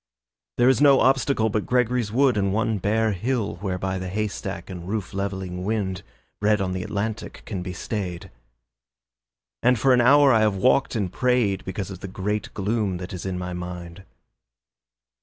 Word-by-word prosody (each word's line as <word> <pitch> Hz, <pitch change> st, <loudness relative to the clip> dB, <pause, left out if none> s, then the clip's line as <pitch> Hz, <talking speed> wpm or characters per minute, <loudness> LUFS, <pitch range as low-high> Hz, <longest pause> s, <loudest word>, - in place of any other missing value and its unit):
There 120 Hz, -, +4 dB
is 130 Hz, +1 st, +4 dB
no 140 Hz, -2 st, +7 dB
obstacle 135 Hz, -3 st, +2 dB
But 105 Hz, 0 st, -1 dB
Gregory's 125 Hz, -3 st, +1 dB
Wood 130 Hz, +2 st, +3 dB
and 100 Hz, -2 st, +1 dB
one 110 Hz, 0 st, 0 dB
bare 110 Hz, +3 st, +1 dB
hill 105 Hz, -1 st, -2 dB
Whereby 95 Hz, 0 st, -2 dB
the 95 Hz, 0 st, -5 dB
haystack 100 Hz, -3 st, -4 dB
and 90 Hz, -2 st, -8 dB
roof 105 Hz, -1 st, -3 dB
levelling 95 Hz, -2 st, -3 dB
wind, 95 Hz, -3 st, -2 dB, 0.4 s
Bred 105 Hz, +1 st, +3 dB
on 95 Hz, -1 st, -1 dB
the 90 Hz, 0 st, -3 dB
Atlantic, 105 Hz, +3 st, -4 dB
can 95 Hz, -5 st, -4 dB
be 90 Hz, +1 st, -5 dB
stayed; 90 Hz, -2 st, -5 dB, 1.3 s
And 125 Hz, 0 st, +4 dB
for 130 Hz, +4 st, +4 dB
an 125 Hz, -, +4 dB
hour 140 Hz, +2 st, +6 dB
I 110 Hz, -, +5 dB
have 105 Hz, -2 st, +2 dB
walked 130 Hz, +6 st, +2 dB
and 100 Hz, -5 st, -2 dB
prayed 125 Hz, -6 st, +1 dB
Because 95 Hz, +1 st, -4 dB
of 95 Hz, -, -8 dB
the 95 Hz, -, -6 dB
great 100 Hz, +3 st, -3 dB
gloom 105 Hz, -2 st, -1 dB
that 90 Hz, +2 st, -7 dB
is 90 Hz, +1 st, -5 dB
in 95 Hz, -1 st, -3 dB
my 90 Hz, 0 st, -4 dB
mind. 90 Hz, 0 st, -7 dB
100 Hz, 175 wpm, -24 LUFS, 95-115 Hz, 1.3 s, no